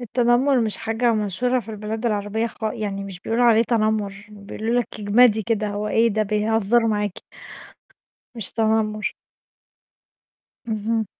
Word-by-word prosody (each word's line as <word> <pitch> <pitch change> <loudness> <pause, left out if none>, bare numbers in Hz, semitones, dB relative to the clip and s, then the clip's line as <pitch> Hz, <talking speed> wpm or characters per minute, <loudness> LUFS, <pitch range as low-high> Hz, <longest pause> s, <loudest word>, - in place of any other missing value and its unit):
التنمر 245 +3 +2
مش 220 -2 -1
حاجة 225 +1 0
مشهورة 220 +4 0
في 225 - -10
البلاد 220 +2 -4
العربية 210 +1 -1
خ 225 - -11
يعني 205 -2 -3
مش 190 -2 -8
بيقولوا 235 +2 0
عليه 230 -1 +5
تنمر، 215 -3 -1
بيقولوا 215 +3 -2
لِك 240 - -5
اجمدي 220 +1 +4
كده، 215 -1 -1
هو 205 +1 -3
إيه 230 +2 +3
ده! 215 0 0
بيهزروا 220 +2 +2
معاكِ. 210 -3 -1 1.2
مش 225 -5 -6
تنمر. 220 -1 0 1.6
اهم. 220 0 -1
220 Hz, 135 wpm, -22 LUFS, 210-230 Hz, 1.6 s, عليه